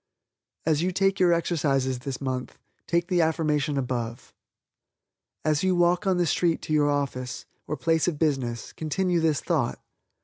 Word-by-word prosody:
As 155 -1 +2
you 180 +2 +1
take 195 +1 +1
your 180 -2 +5
exercises 140 -7 +1
this 130 0 -5
month, 130 -2 -4 0.3
take 170 0 +1
the 180 -2 +2
affirmation 150 -3 +1
above. 120 -3 -3 1.1
As 155 0 +2
you 185 -1 +2
walk 175 +2 +2
on 185 -2 +3
the 175 - +2
street 170 +1 +1
to 155 - -3
your 145 -1 +3
office, 135 -3 -2 0.2
or 150 - -3
place 165 0 +1
of 165 -4 0
business, 130 -7 -1
continue 175 +3 0
this 155 -5 +1
thought. - - 0
155 Hz, 160 wpm, -26 LUFS, 135-175 Hz, 1.1 s, your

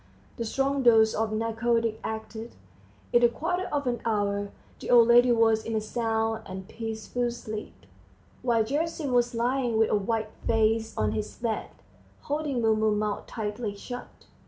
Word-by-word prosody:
The 230 - -2
strong 275 +4 0
dose 225 -3 +5
of 220 0 -1
narcotic 230 0 0
acted; 220 +1 -6 0.6
in 240 - +6
a 240 - +7
quarter 355 +9 -2
of 285 -1 -1
an 240 -2 -1
hour 205 -2 0 0.3
the - - -7
old 235 -2 +7
lady 240 +1 +7
was 225 -1 +3
in 225 - -3
a - - +2
sound 225 0 -1
and 190 0 -7
peaceful 225 +2 -3
sleep; 215 -2 -7 0.6
while 235 -3 +2
Gerasim 295 +3 -2
was 245 -1 +2
lying 240 0 0
with 220 0 +3
a - - +4
white 215 +1 -1 0.2
face 225 0 +1
on 105 -1 +1
his 105 -1 -4
bed, 230 -2 -3 0.5
holding 290 -4 -2
Mumu's 220 -1 +3
mouth 210 -1 -2
tightly 210 -1 -4
shut. 245 +4 -9
225 Hz, 160 wpm, -27 LUFS, 220-240 Hz, 0.6 s, a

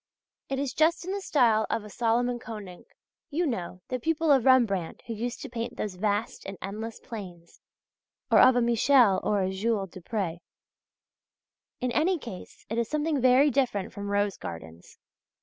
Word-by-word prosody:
It 270 - -1
is 275 -1 -2
just 325 +2 +2
in 375 - -3
the 400 0 -3
style 230 - +3
of 220 - -1
a 210 - -10
Salomon 240 +2 +1
Konink 205 -6 -9 0.4
you 340 +3 0
know, 185 - -4
the 255 - -2
pupil 325 +3 +1
of 265 -4 +4
Rembrandt 225 -10 +3
who 230 - -4
used 235 +5 -4
to - - -5
paint 235 0 -5
those 210 -3 -3
vast 205 +3 -2
and 195 0 -6
endless 220 +3 -6
plains 180 -7 -10 0.7
or - - +7
of 255 0 +7
a 245 - +3
Michel 235 -3 +4
or 205 0 +1
a 185 - -1
Jules 195 -1 -1
Dupré. 185 -2 -4 1.4
In 250 -1 0
any 345 +8 +2
case 230 - -10
it 225 +2 -2
is 235 - -1
something 300 -2 0
very 260 +3 +5
different 240 -7 0
from 200 0 -5
rose 205 -1 0
gardens. 80 0 -9
230 Hz, 170 wpm, -27 LUFS, 200-260 Hz, 1.4 s, or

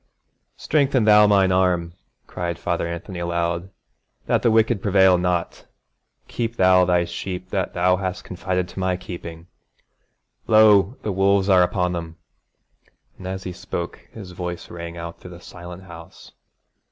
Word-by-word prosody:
'Strengthen 140 -5 +1
thou 105 0 +6
mine 100 -2 +3
arm,' 90 -2 +1 0.3
cried 85 -1 -4
Father 85 0 -2
Anthony 85 +2 -6
aloud, 85 +1 -2 0.6
'that - - +1
the 120 - +3
wicked 110 -1 +2
prevail 95 -2 +4
not! 90 -1 -2 0.6
Keep 115 -1 -3
thou 90 -2 +5
thy 90 -1 +2
sheep 90 +1 -6
that 95 -2 -2
thou 90 +1 +3
hast 95 +1 -4
confided 90 0 -3
to 90 - -8
my 95 -1 0
keeping. 85 -2 -9 1.0
Lo! 110 0 +5
the 105 - -2
wolves 100 +1 +2
are 95 -2 +6
upon 90 0 +1
them!' 85 -1 -6 1.0
and 95 - -8
as 95 0 -5
he 90 - -6
spoke - - -6
his 100 -5 -10
voice 90 -1 -6
rang 85 0 -7
out 85 0 -7
through 90 - -11
the 90 -1 -11
silent 90 +1 -11
house. 85 -2 -13
90 Hz, 150 wpm, -22 LUFS, 85-95 Hz, 1.0 s, thou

